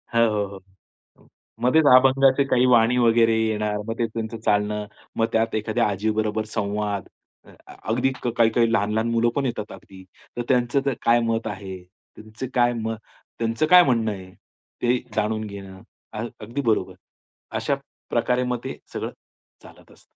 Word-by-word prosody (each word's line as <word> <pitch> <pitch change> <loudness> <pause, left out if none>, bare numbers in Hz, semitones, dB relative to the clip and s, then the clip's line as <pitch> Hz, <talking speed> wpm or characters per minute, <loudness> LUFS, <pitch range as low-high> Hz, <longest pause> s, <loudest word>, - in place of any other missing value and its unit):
हो, - - +4 0.3
हो, 100 - -9 0.6
हो. - - -24 0.3
मध्येच 145 +5 +4
अभंगाचे 135 +1 +5
काही 130 -1 +3
वाणी 120 0 +4
वगैरे 115 -1 +4
येणार, 105 -1 0
मग 115 - -1
ते 115 - +2
त्यांचं 115 0 -5
चालणं, 105 0 +1 0.3
मग 115 - +3
त्यात 115 0 +1
एखाद्या 110 +2 0
आजीबरोबर 110 +1 -1
संवाद. 105 -2 -2 0.4
अ, - - -16 0.2
अगदी 125 +4 -1
काही-काही 115 -1 +2
लहान-लहान 110 +3 +1
मुलं 115 0 +2
पण 140 -1 0
येतात 110 -4 -3
अगदी. 95 -1 -13 0.3
तर - - 0
त्यांचं 125 +1 +2 0.2
काय 120 +1 +5
मत 115 0 -1
आहे? 95 -2 -6
त्यांचं 110 +5 -11
काय 120 -1 +3
म 115 -1 -3 0.5
त्यांचं 115 +6 0
काय 180 +1 +9
म - - -1
म्हणणं 115 -4 +1
आहे. 95 -2 -9 0.5
ते 125 +1 +2 0.2
जाणून 110 0 -1
घेणं 95 -2 -10 0.6
अगदी 120 +7 -4
बरोबर. 115 -4 0 0.6
अशा - - 0 0.3
प्रकारे 125 0 +1
मग 125 -1 -2
ते 130 - -6 0.2
सगळं - - -4 0.5
चालत - - -17
असतं. - - -21
115 Hz, 150 wpm, -23 LUFS, 105-120 Hz, 0.6 s, काय